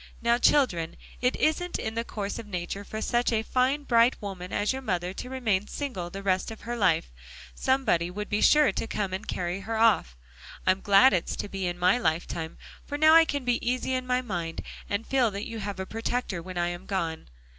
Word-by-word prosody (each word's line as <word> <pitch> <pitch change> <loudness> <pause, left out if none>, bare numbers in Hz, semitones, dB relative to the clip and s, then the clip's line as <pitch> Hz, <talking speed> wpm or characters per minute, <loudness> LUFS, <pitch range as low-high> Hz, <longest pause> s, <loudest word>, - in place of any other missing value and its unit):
"Now, 235 0 +2
children, 215 - +2 0.2
it 250 +1 +2
isn't 350 +3 0
in 220 - -4
the 230 +1 -1
course 205 -3 -4
of 225 - -8
nature 185 +1 -4
for 215 +2 -5
such 240 +1 +1
a 220 -1 +1
fine 260 +5 +1
bright 235 -1 +3
woman 185 -3 -6
as 205 +4 0
your 265 - -5
mother 180 -6 -2
to 250 - -7
remain 220 -7 0
single 240 -12 -4
the 195 +2 -7
rest 190 -1 +1
of 225 - -9
her 240 +1 -4
life; 180 - +2 0.4
somebody 205 - +1
would 210 +3 -5
be 205 - -1
sure 300 -2 +6
to - - -3
come 200 -4 -2
and 190 +3 -5
carry 175 +1 -2
her 220 +3 -4
off. 215 - +3 0.5
I'm 185 +1 +3
glad 205 +6 +6
it's 175 - 0
to - - -4
be 195 -2 -3
in 175 0 -3
my 180 +6 +3
lifetime, 160 -3 -2 0.3
for 290 - -5
now 310 +1 +6
I 330 0 +8
can 285 -4 -3
be 245 -1 +1
easy 255 +1 -1
in 255 0 -2
my 250 0 +1
mind, 175 -7 -4 0.3
and 205 +3 -2
feel 260 -4 +2
that 200 0 -5
you 230 -1 -6
have 200 -2 -5
a 190 - -3
protector 225 -3 -3
when 185 +1 -8
I 175 0 +1
am 175 +2 -7
gone. 165 -5 -3
210 Hz, 220 wpm, -27 LUFS, 185-250 Hz, 0.5 s, I